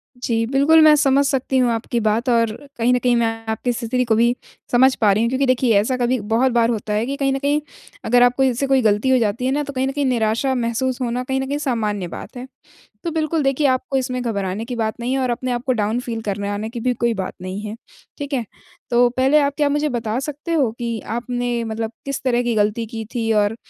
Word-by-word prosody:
जी, 230 -2 -1
बिल्कुल, 305 +4 +5
मैं 305 -1 +7
समझ 280 -1 +3
सकती 270 -1 0
हूँ 245 -2 +3
आपकी 230 +1 -2
बात 225 +3 0
और 230 -2 +2 0.2
कहीं 240 +2 +2
न 250 - +2
कहीं 245 0 +2
मैं 235 -1 +2 0.2
आपकी 230 +3 -1
स्थिति 240 +2 -1
को 225 -1 +2
भी 235 +2 +3 0.4
समझ 260 +2 +5
पा 205 -2 +5
रही 215 +3 +2
हूँ, 235 - +1
क्योंकि 265 +2 +1
देखिए 255 -3 +2
ऐसा 255 +5 0
कभी 245 0 +1
बहुत 225 +5 +1
बार 235 -1 +3
होता 215 -2 -2
है 215 +2 0
कि 275 +2 -3
कहीं 275 -1 +1
न 270 - -1
कहीं 290 +2 +1 0.4
अगर 245 +1 +4
आपको 245 +2 +3
इससे 260 +1 +1
कोई 265 -1 +3
गलती 215 +3 +2
हो 260 - +5
जाती 230 +2 0
है 260 - +1
ना 295 +1 0
तो 280 -1 -7
कहीं 260 +1 0
न - - -1
कहीं 285 0 -1
निराशा 235 +2 +1
महसूस 245 +2 -1
होना, 245 +1 -1
कहीं 265 +1 -2
न 265 - -4
कहीं 285 +1 -2
सामान्य 215 -9 -2
बात 245 - -9
है। 255 +2 -7 0.6
तो 335 - -2
बिल्कुल 315 -1 0
देखिए 275 +1 +2
आपको 260 +1 0
इसमें 255 -1 -2
घबराने 200 -2 -3
की 245 0 -5
बात 220 0 -2
नहीं 245 +2 -2
है 270 - 0
और 255 -1 0
अपने 250 +1 -2
आपको 245 +2 -1
डाउन 220 +1 0
फ़ील 230 -2 -5
करने 200 -1 -3
आने 210 +2 -3
की 235 0 -6
भी 250 +1 0
कोई 235 0 0
बात 190 -3 -4
नहीं 185 +2 -5
है। 215 +1 -6 0.4
ठीक 285 -1 -5
है? 240 -4 -1 0.4
तो 245 0 +4
पहले 265 +4 +3
आप 280 -1 +1
क्या 290 -1 +2
मुझे 295 +1 0
बता 230 -2 -2
सकते 300 +4 -5
हो 270 -8 +2
कि 235 -2 -3
आपने 240 0 -3
मतलब 225 0 -4
किस 275 -1 -3
तरह 245 -1 +1
की 240 -2 0
गलती 210 +2 +1
की 225 -1 -6
थी 225 -1 0
और 210 +1 +2
245 Hz, 250 wpm, -20 LUFS, 225-265 Hz, 0.6 s, मैं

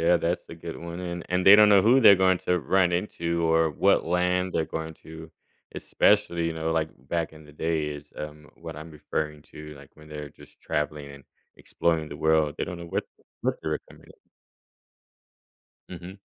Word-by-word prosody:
yeah, 85 +1 +4
that's 85 +1 -2
a - - -8
good 85 0 -8
one. 85 +1 -7
And 85 -1 -5
and 90 +1 0
they 95 - +11
don't 105 0 +7
know 100 -2 +6
who 125 +5 +5
they're 105 -5 +9
going 95 -1 +3
to 90 - 0
run 90 +5 +2
into 85 -2 -2
or 80 -1 +3
what 75 - +2
land 90 +1 0
they're 80 - 0
going 80 0 -6
to, 80 0 -11 0.4
especially, 85 -1 +1
you 80 - -2
know, 80 0 -2
like, 80 -1 0 0.2
back 85 -2 -2
in 75 0 -14
the 75 - -16
day 80 0 -1
is, 75 0 -9
um, 75 -1 -8
what 80 -2 -9
I'm 80 +2 -9
referring 75 0 -4
to, 75 0 -10
like, 70 -1 -15
when 75 0 -16
they're 75 -1 -7
just - - -19
traveling 75 -1 -3
and 70 -2 -14 0.3
exploring 80 -2 -1
the 70 - -8
world, 80 -1 +2
they - - -2
don't 90 - -7
know 85 - -8
what - - -2 0.4
what - - +1
they - - -3
were - - -1
coming - - -17
up - - -21 1.6
Mhm. 90 +2 -10
80 Hz, 200 wpm, -26 LUFS, 75-90 Hz, 1.6 s, they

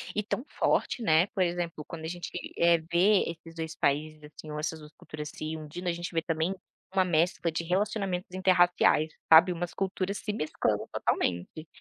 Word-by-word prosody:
E 210 - 0
tão 235 - -3
forte, 245 - 0
né, 160 0 +4
por 190 - 0
exemplo, 170 -3 -3
quando 160 -1 -8
a - - -2
gente, 175 +1 -6 0.3
eh, 170 0 +5
vê 190 +4 +5
esses 165 0 -8
2 160 -1 -5
países, 150 +2 -1
assim, 150 +1 -11
ou 150 - -4
essas 160 +1 -3
2 150 -1 -13
culturas 150 -1 -7
se 155 +1 -4
unindo, 160 +4 -7
a - - +3
gente 175 +1 -5
vê, 165 - +1
também, 165 +3 -1 0.4
uma 190 -1 +3
mescla 170 0 +1
de 165 - -2
relacionamentos 190 0 -1
interraciais, 175 -4 +4 0.2
sabe, 170 +3 +9
umas 175 0 -4
culturas 195 +1 -2
se 210 - -3
mesclando 155 -7 -1
totalmente. 90 - -1
170 Hz, 185 wpm, -29 LUFS, 155-185 Hz, 0.4 s, sabe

